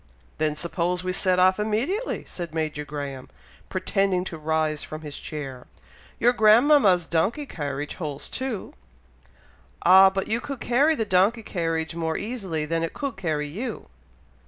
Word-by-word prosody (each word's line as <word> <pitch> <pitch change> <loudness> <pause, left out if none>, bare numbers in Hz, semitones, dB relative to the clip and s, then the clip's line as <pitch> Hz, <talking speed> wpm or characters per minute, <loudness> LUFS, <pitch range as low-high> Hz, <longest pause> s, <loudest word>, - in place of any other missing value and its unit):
"Then 155 -1 +1
suppose 175 +3 -1
we 185 0 -1
set 185 -1 +2
off 185 +2 +4
immediately!" 245 - -1
said 170 -3 -7
Major 155 -2 -2
Graham, 140 -3 -6 0.4
pretending 190 0 0
to 170 -3 -6
rise 155 -1 0
from 155 0 -7
his 145 -2 -7
chair. 135 -5 -7 0.5
"Your 245 +1 +4
grandmama's 220 - +5
donkey 195 - 0
carriage 145 - -4
holds 150 -5 -5
two." 260 -6 -4 1.1
"Ah! 190 +2 +8
but 190 0 -3
you 225 +2 0
could 275 -2 -6
carry 280 +8 +3
the 225 - -1
donkey 205 +4 +2
carriage 165 -4 -2
more 165 -1 -2
easily 195 -9 -3
than 165 +2 -1
it 165 - -3
could 280 -2 -3
carry 155 -6 -2
you!" 205 - -6
180 Hz, 150 wpm, -25 LUFS, 155-215 Hz, 1.1 s, Ah